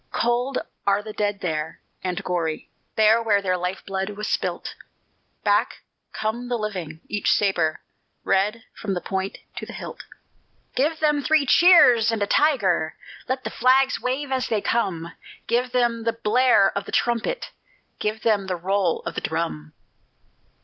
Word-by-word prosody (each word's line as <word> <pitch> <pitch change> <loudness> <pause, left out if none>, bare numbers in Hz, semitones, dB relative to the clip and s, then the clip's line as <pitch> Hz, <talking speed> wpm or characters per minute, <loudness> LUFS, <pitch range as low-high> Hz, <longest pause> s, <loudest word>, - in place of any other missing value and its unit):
Cold 245 +3 0 0.3
are 200 +1 +3
the 215 0 -7
dead 205 -1 -1
there, 160 -2 -3 0.2
and 180 -1 -3
gory, 165 -3 -2 0.3
There 220 +1 +5
where 215 -3 +3
their 185 -2 0
life 180 +1 -4
blood 195 0 -2
was 210 +1 -5
spilt, - - -2 0.7
Back - - +1 0.3
come 220 +3 -3
the 245 - 0
living, 180 -8 -5
each 205 -1 -1
sabre 175 -6 +1 0.4
Red 210 +4 +1
from 200 -3 -4
the 175 - -3
point 190 0 -3 0.2
to - - -5
the - - -8
hilt. - - -8 0.7
Give 310 +5 +1
them 300 -2 +2
three 310 0 +3
cheers 250 -9 +6
and 220 -2 0
a - - +2
tiger! 200 - +2 0.3
Let 260 0 -1
the - - -4
flags 260 +2 +3
wave 265 +2 -2
as 260 -1 0
they 220 - 0
come! 175 -7 -1 0.3
Give 245 +2 0
them 240 -2 +1
the 230 0 0
blare 230 -2 +3
of 200 - -2
the - - -8
trumpet! 240 - -1 0.5
Give 215 +1 -2
them 205 -4 +2
the 185 - -1
roll 185 0 0
of - - -3
the - - -4
drum! 80 - -3
215 Hz, 160 wpm, -23 LUFS, 190-245 Hz, 0.7 s, cheers